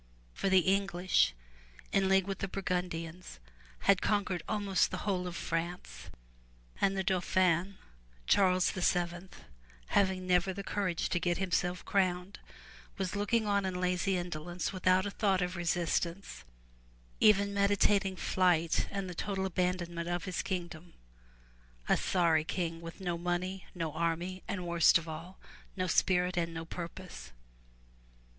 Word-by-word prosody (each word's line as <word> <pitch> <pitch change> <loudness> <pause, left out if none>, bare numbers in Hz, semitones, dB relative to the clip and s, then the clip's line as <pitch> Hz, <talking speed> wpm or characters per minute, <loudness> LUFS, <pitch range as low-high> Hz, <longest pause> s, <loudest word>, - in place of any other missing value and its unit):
For 195 - -1
the 190 -1 +6
English 190 - +2 0.6
in 195 -1 +2
league 190 -1 +4
with 195 -1 -4
the 195 - -2
Burgundians, 180 - -4 0.4
had 195 -2 +4
con 205 -2 +1
quered 180 -2 -3
almost 205 -3 +1
the - - -5
whole 185 -3 0
of 175 - -6
France, 170 +2 -4 0.7
and 195 0 +2
the 190 - 0
Dauphin 185 0 +1 0.5
Charles 185 - +3
VII, 175 0 -1 0.6
having 190 -2 +2
never 180 +1 +2
the 200 +1 -6
courage 185 -4 -1
to 175 - 0
get 175 0 0
himself 180 -1 -1
crowned, 185 0 0 0.6
was 190 0 -2
looking 215 +2 +1
on 200 -1 +1
in 185 -1 -2
lazy 180 +1 +1
indolence 175 +1 -4
without 185 0 +3
a 205 - -3
thought 195 -2 +1
of 180 0 -2
resistance, 170 - -2 0.7
even 200 -1 +5
meditating 200 -1 +2
flight 175 -3 +2
and 195 -1 -4
the 180 - -6
total 190 +2 -2
abandonment 175 -2 -1
of 175 -1 -2
his 185 -3 -2
kingdom, 175 -2 -5 0.5
— - - -29
a - - +4
sorry 165 -4 +2
king 165 0 -3
with 165 +3 -9
no 175 -2 -2
money, 180 +2 -2
no 165 -4 -3
army 170 +3 -2
and, 180 -3 -3
worst 170 0 +5
of 165 0 -7
all, 165 +4 -8 0.4
no 185 - 0
spirit 180 +1 +2
and 165 -1 -1
no 165 0 -5
purpose. 175 +2 -8
180 Hz, 145 wpm, -32 LUFS, 170-190 Hz, 0.7 s, the